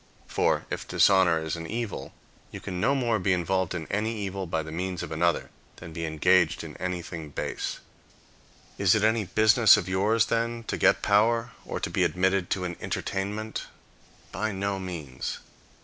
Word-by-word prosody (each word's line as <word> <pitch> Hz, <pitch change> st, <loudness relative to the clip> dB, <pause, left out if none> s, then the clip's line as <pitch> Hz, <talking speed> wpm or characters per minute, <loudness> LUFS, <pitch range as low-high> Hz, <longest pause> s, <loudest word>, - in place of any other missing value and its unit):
For, -, -, +1 dB
if -, -, -4 dB
dishonor 95 Hz, -4 st, +4 dB
is 80 Hz, -, -2 dB
an 80 Hz, 0 st, -6 dB
evil, 115 Hz, +1 st, -4 dB, 0.4 s
you -, -, -8 dB
can 90 Hz, -2 st, -5 dB
no 140 Hz, -, +3 dB
more 120 Hz, -5 st, +1 dB
be 95 Hz, +1 st, +2 dB
involved 90 Hz, +1 st, 0 dB
in 80 Hz, -3 st, -4 dB
any 110 Hz, +3 st, -1 dB
evil 95 Hz, -2 st, -4 dB
by 80 Hz, -1 st, -1 dB
the 80 Hz, -, -8 dB
means 90 Hz, +1 st, -3 dB
of -, -, -7 dB
another, 85 Hz, +1 st, 0 dB, 0.2 s
than 85 Hz, -2 st, -10 dB
be 85 Hz, 0 st, -3 dB
engaged 85 Hz, +2 st, +3 dB
in -, -, -8 dB
anything 85 Hz, -3 st, -4 dB
base. -, -, -4 dB, 1.0 s
Is 100 Hz, 0 st, +5 dB
it 105 Hz, -, +1 dB
any 110 Hz, -1 st, +2 dB
business 110 Hz, +3 st, +6 dB
of 95 Hz, -4 st, -3 dB
yours, 105 Hz, +4 st, +2 dB
then, 115 Hz, 0 st, -1 dB
to -, -, 0 dB
get -, -, +3 dB
power, 115 Hz, +3 st, +3 dB, 0.2 s
or -, -, -3 dB
to -, -, -3 dB
be 95 Hz, -, +2 dB
admitted 90 Hz, +2 st, +1 dB
to 95 Hz, -, -1 dB
an 90 Hz, -1 st, -4 dB
entertainment? 105 Hz, +3 st, -3 dB, 0.6 s
By 110 Hz, +2 st, -2 dB
no 100 Hz, 0 st, -2 dB
means. 85 Hz, -8 st, -5 dB
95 Hz, 175 wpm, -27 LUFS, 85-110 Hz, 1.0 s, business